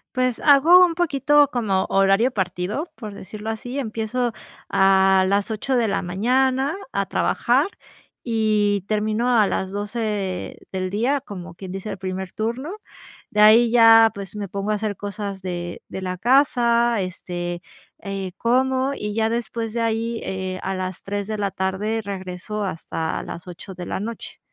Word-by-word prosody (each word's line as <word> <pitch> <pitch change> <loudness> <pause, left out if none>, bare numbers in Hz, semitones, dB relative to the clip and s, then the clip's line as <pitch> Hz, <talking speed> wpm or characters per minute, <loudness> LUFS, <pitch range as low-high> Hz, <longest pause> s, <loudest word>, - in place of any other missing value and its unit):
Pues, 255 -2 +1
hago 320 +6 +7
un 335 -2 -2
poquito 290 -3 +3
como 205 -6 0
horario 195 +6 +3
partido, 190 - -3
por 215 -4 -8
decirlo 210 +3 -7
así. 245 +5 -6
Empiezo 230 0 -2 0.4
a 190 0 +4
las 200 +2 +1
8 245 +5 -1
de 235 -3 +2
la 195 - 0
mañana 260 - +1 0.2
a 200 0 0
trabajar 260 - +1 0.6
y 215 -4 +1
termino 215 +3 +1
a 210 - +5
las 190 0 -2
12 205 -2 -3
del 185 -1 -2
día, 245 +8 0
como 185 -7 -9
quien 185 +1 -9
dice, 195 +3 -6
el 195 - -5
primer 185 -1 -4
turno. 235 +9 -3 0.6
De 210 - 0
ahí 225 +2 +7
ya, 225 -1 +7
pues, 200 +1 -7
me 200 -2 -4
pongo 200 +2 -3
a 215 - +2
hacer 210 -2 -2
cosas 200 -1 -5
de 175 -2 -5
de 190 - -6
la 185 -1 -3
casa 240 -2 +3
este, 175 -1 -5 0.4
eh, 195 -2 -4
como, 260 +3 +1
y 210 -5 -4
ya 225 0 +1
después 230 -1 -3
de 235 - -2
ahí, 230 0 -1
eh, 190 -1 -4
a 190 0 -2
las 185 -1 -4
3 200 0 -3
de 215 0 -4
la 200 -1 0
tarde 205 +4 -2
regreso, 195 +1 -5
hasta 165 -3 -3
las 170 - -8
8 180 +2 -9
de 180 -1 -7
la - - -3
noche. 225 +3 -6
210 Hz, 165 wpm, -22 LUFS, 190-235 Hz, 0.6 s, hago